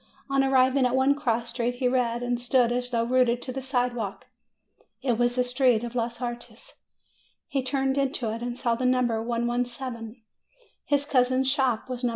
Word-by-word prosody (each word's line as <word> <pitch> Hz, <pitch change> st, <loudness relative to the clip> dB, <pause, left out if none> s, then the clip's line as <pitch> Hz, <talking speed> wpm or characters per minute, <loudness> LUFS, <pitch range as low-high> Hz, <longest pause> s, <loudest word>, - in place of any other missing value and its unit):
On 275 Hz, 0 st, +3 dB
arriving 260 Hz, 0 st, +3 dB
at 250 Hz, -, -1 dB
one 265 Hz, +2 st, +4 dB
cross 240 Hz, -5 st, -1 dB
street, 245 Hz, 0 st, -2 dB
he 250 Hz, 0 st, 0 dB
read, 245 Hz, -1 st, 0 dB
and 245 Hz, 0 st, -1 dB
stood 245 Hz, -1 st, +2 dB
as 245 Hz, 0 st, -1 dB
though 230 Hz, -2 st, 0 dB
rooted 245 Hz, 0 st, +2 dB
to 255 Hz, -, -5 dB
the 265 Hz, +1 st, -5 dB
sidewalk. 245 Hz, -6 st, -2 dB, 0.8 s
It 245 Hz, -4 st, 0 dB
was 240 Hz, 0 st, +2 dB
the 250 Hz, -, +2 dB
street 250 Hz, -2 st, +2 dB
of 240 Hz, 0 st, -5 dB
los 235 Hz, -1 st, -2 dB
Artes. 245 Hz, -, -7 dB, 0.7 s
He 275 Hz, -, -1 dB
turned 270 Hz, +1 st, 0 dB
into 260 Hz, -5 st, -1 dB
it, 230 Hz, -, -6 dB
and 245 Hz, 0 st, -4 dB
saw 240 Hz, -2 st, 0 dB
the 240 Hz, +2 st, -3 dB
number 245 Hz, -3 st, +1 dB
117; 240 Hz, 0 st, -3 dB, 0.6 s
his 285 Hz, -1 st, +1 dB
cousin's 260 Hz, -1 st, +2 dB
shop 260 Hz, -5 st, 0 dB
was 250 Hz, -1 st, -5 dB
No. 245 Hz, -, +2 dB
245 Hz, 185 wpm, -26 LUFS, 240-260 Hz, 0.8 s, one